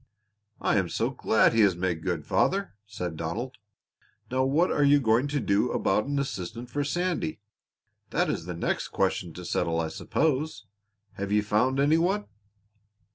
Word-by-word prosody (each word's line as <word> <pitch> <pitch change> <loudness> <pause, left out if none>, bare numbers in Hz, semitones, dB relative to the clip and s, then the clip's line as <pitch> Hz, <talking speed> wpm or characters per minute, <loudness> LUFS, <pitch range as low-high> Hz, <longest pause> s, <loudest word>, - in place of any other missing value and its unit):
"I - - +2
am 95 -3 +1
so 115 +8 -1
glad 110 -5 +3
he 115 - +4
has 100 -4 +4
made 90 -2 -1
good, 85 -5 -2
father," 195 - +1
said 90 -5 -5
Donald. 115 +12 -4 0.7
"Now, 130 +1 +2
what 155 +7 +2
are 145 - +2
you 145 0 +6
going 120 +2 +2
to 145 0 -1
do 105 +1 +1
about 105 +5 +1
an 140 0 -1
assistant 120 -2 -4
for 145 +2 -1
Sandy? 175 +1 -1 0.7
That - - +1
is 80 - -2
the 90 -1 -5
next 85 - -1
question 95 -2 -1
to 90 +2 -8
settle, 85 -1 0
I 80 -1 -1
suppose. 145 - -1 0.5
Have 100 0 -3
you 105 0 +3
found 125 +6 +1
any 150 +4 +4
one?" 195 +5 +1
115 Hz, 170 wpm, -27 LUFS, 95-145 Hz, 0.7 s, you